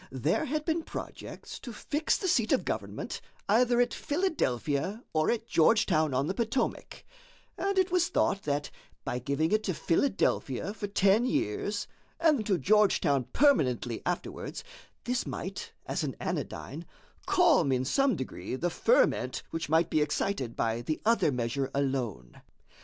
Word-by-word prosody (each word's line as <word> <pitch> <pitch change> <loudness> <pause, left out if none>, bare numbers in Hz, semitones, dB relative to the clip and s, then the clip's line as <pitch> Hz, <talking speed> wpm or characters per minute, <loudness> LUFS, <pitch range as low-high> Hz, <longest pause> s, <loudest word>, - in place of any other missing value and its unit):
There 145 - 0
had 305 +2 -2
been 330 0 0
projects - - -8
to 245 - -8
fix 295 +7 -1
the 380 - -3
seat 230 -10 +2
of - - +2
government - - -4 0.3
either 240 +3 +3
at 245 0 +2
Philadelphia 210 - -1
or 155 0 +2
at 230 -1 0
Georgetown 160 -5 +3
on 130 +2 +1
the 185 - -1
Potomac; 235 +3 -2 0.5
and 395 0 -1
it 375 -1 +3
was 355 -1 +3
thought 200 - +1
that 145 -2 -2 0.3
by 125 - -2
giving 140 +6 0
it 215 0 +2
to 185 - -1
Philadelphia 175 - 0
for 205 -1 -5
ten 200 +2 +3
years, 205 - -1 0.3
and 300 -8 +3
to 195 -4 +2
Georgetown 170 - +3
permanently 125 - +2
afterwards, - - -4 0.4
this 245 0 -1
might, - - -5
as - - -2
an - - -3
anodyne, - - -4 0.4
calm 175 - +4
in 130 0 +1
some 275 - +2
degree 130 0 -5
the 175 +6 -1
ferment 485 - +2
which 165 -2 -3
might 160 +1 +3
be 155 - +3
excited 150 - -1
by 115 +1 0
the 155 +6 -2
other 230 -9 +3
measure 125 +2 -1
alone. 125 - -2
190 Hz, 150 wpm, -29 LUFS, -, 0.5 s, calm